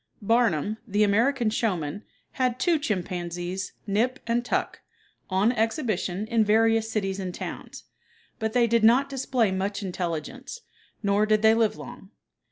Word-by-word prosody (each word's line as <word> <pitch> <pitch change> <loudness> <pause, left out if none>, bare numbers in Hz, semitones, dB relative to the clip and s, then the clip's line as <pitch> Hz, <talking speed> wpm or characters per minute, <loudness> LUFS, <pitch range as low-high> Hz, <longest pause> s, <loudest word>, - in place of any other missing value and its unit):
Barnum, 220 -3 +2
the 205 0 +2
American 230 +3 +2
showman, 185 -6 -1 0.3
had 255 -1 -1
two 340 -3 +2
chimpanzees, 180 -4 -3
"Nip" 225 +6 0
and 235 +1 0
"Tuck," - - -2 0.5
on 195 +4 +3
exhibition 220 - -1
in 225 0 +2
various 225 +1 +2
cities 195 -2 -2
and 185 -2 -4
towns, - - -7 0.6
but 220 -1 -2
they 245 -1 +4
did 230 -1 +2
not 250 +5 +5
display 255 -5 0
much 200 +2 -2
intelligence, 190 - -5 0.4
nor 205 +1 +2
did 215 0 +2
they 220 0 +7
live 225 -1 +1
long. 240 -5 -10
220 Hz, 140 wpm, -26 LUFS, 195-240 Hz, 0.6 s, they